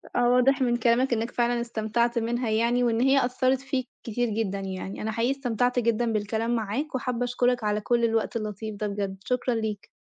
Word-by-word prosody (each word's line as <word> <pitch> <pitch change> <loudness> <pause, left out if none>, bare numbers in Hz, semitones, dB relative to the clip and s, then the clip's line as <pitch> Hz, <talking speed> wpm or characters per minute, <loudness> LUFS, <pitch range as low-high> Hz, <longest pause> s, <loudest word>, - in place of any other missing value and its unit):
آه 245 0 +3
واضح 250 +2 +4
من 240 -1 +2
كلامك 240 +2 +2
إنك 230 +1 -1
فعلًا 240 0 +1
استمتعت 235 +1 0
منها 235 +1 -1
يعني، 235 +3 +2
وإن 230 -1 +1
هي 270 0 +4
أثرت 255 +1 +1
فيك 265 -2 -2 0.2
كتير 240 +1 -1
جدًا 205 -2 -1
يعني، 190 0 -5
أنا 220 +1 -2
حقيقي 230 +3 +1
استمتعت 250 -2 0
جدًا 230 0 +1
بالكلام 220 +3 -1
معاك، 235 +7 -2
وحابّة 250 -2 -1
أشكرك 245 -1 +1
على 210 0 0
كل 235 +2 +1
الوقت 225 0 0
اللطيف 215 0 -4
ده 210 +1 -2
بجد، 200 -1 -3
شكرًا 250 0 0
ليك. 215 -2 -3
235 Hz, 190 wpm, -26 LUFS, 220-245 Hz, 0.2 s, واضح